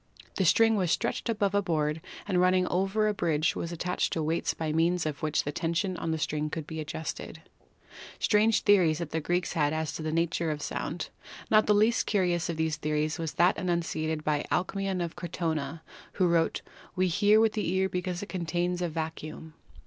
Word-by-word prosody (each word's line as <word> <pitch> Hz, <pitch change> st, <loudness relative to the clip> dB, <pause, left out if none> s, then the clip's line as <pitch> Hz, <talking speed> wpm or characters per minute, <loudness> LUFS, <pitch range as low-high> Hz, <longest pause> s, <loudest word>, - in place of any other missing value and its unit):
The 190 Hz, -, +2 dB
string 225 Hz, +6 st, +5 dB
was 185 Hz, -3 st, +1 dB
stretched 235 Hz, -, -1 dB
above 205 Hz, -3 st, +1 dB
a 205 Hz, -, +3 dB
board, 155 Hz, -3 st, -1 dB, 0.3 s
and 180 Hz, -3 st, +2 dB
run 185 Hz, 0 st, +4 dB
ning 185 Hz, 0 st, +3 dB
over 195 Hz, +4 st, +1 dB
a 210 Hz, -, +1 dB
bridge 160 Hz, -5 st, +1 dB
was 170 Hz, -, -4 dB
attached 180 Hz, +1 st, -1 dB
to 160 Hz, -, -1 dB
weights 160 Hz, +2 st, 0 dB
by 155 Hz, -2 st, -2 dB
means 170 Hz, +1 st, +2 dB
of 150 Hz, -2 st, -3 dB
which 155 Hz, -1 st, +1 dB
the 145 Hz, -, -3 dB
tension 170 Hz, +4 st, -1 dB
on 165 Hz, -, -4 dB
the 160 Hz, -, 0 dB
string 150 Hz, 0 st, -1 dB
could 155 Hz, 0 st, -4 dB
be 160 Hz, +1 st, -6 dB
adjusted. 155 Hz, +1 st, -6 dB, 0.7 s
Strange 215 Hz, +1 st, +3 dB
theories 180 Hz, -7 st, +4 dB
the 160 Hz, -1 st, -3 dB
Greeks 175 Hz, +3 st, -1 dB
had 150 Hz, -2 st, +1 dB
as 155 Hz, -1 st, -1 dB
to -, -, -5 dB
the 155 Hz, 0 st, -2 dB
nature 165 Hz, 0 st, 0 dB
of 150 Hz, -1 st, -3 dB
sound. 165 Hz, +4 st, -4 dB, 0.4 s
Not 215 Hz, 0 st, +5 dB
the 210 Hz, -, +5 dB
least 220 Hz, +3 st, +3 dB
curious 175 Hz, -4 st, +1 dB
of 165 Hz, -, -2 dB
these 160 Hz, -1 st, 0 dB
theories 155 Hz, +2 st, -1 dB
was 165 Hz, -2 st, -3 dB
that 175 Hz, +2 st, +3 dB
enunciated 160 Hz, -3 st, -1 dB
by 150 Hz, -1 st, 0 dB
Alcmaeon 190 Hz, 0 st, -1 dB
of 165 Hz, -, -8 dB
Crotona, 160 Hz, -3 st, -3 dB, 0.3 s
who 185 Hz, -, +2 dB
wrote: 170 Hz, -1 st, +1 dB, 0.3 s
"We 185 Hz, 0 st, +2 dB
hear 205 Hz, +5 st, +4 dB
with 220 Hz, -1 st, +3 dB
the 210 Hz, -5 st, -1 dB
ear 190 Hz, +1 st, +2 dB
because 180 Hz, 0 st, -3 dB
it -, -, -7 dB
contains 175 Hz, 0 st, -1 dB
a 175 Hz, -, 0 dB
vacuum" 160 Hz, 0 st, -6 dB
170 Hz, 200 wpm, -28 LUFS, 155-185 Hz, 0.7 s, string